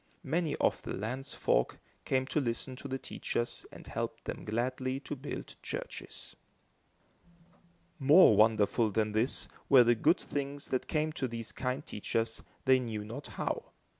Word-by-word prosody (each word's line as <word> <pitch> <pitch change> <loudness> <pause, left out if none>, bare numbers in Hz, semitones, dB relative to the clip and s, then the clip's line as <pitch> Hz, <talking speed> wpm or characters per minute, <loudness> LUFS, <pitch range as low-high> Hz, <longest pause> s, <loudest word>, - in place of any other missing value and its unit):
Many 165 -2 0
of - - +1
the - - -5
land's 130 +7 -3
folk - - +1 0.3
came 130 0 +1
to 150 - 0
listen 130 +1 -2
to 140 - -7
the 135 0 -2
teachers 120 -2 -3
and - - -11
helped - - -4
them - - -5
gladly 130 +4 -1
to 145 - -5
build 140 +2 -6
churches. - - -6 1.6
More 145 - +8
wonderful 110 +1 +4
than 110 +1 +1
this, 110 +5 +1 0.2
were 130 -3 +9
the 120 0 +5
good 155 - +3
things 140 0 -4
that 130 - -1
came 155 0 0
to 135 -5 -2
these 115 -1 -3
kind 130 +3 -2
teachers, 115 +2 -2 0.2
they 130 -1 +6
knew 110 -4 -4
not 120 +7 -7
how. - - -3
130 Hz, 155 wpm, -32 LUFS, 115-140 Hz, 1.6 s, were